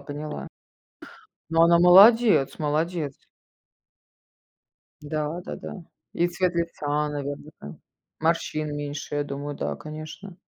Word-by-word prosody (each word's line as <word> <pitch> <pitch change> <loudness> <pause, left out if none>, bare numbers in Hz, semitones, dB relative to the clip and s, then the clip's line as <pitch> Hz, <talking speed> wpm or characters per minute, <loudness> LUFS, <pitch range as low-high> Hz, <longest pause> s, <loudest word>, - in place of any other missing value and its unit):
поняла. 145 +1 -6 1.0
Ну, 165 0 +4
она 170 0 +6
молодец, 195 - +6
молодец. 155 -1 -1 1.9
Да, 150 +2 -3
да-да. 180 - -8 0.3
И 175 +1 +2
цвет 180 0 -1
лица, 150 -3 -1
наверно, 145 0 -5
да, 70 - -9 0.4
морщин 155 -2 -1
меньше, 145 0 -5
я 145 - 0
думаю, 145 0 -6
да, - - -3
конечно. 155 +5 -9
155 Hz, 105 wpm, -25 LUFS, 145-170 Hz, 1.9 s, она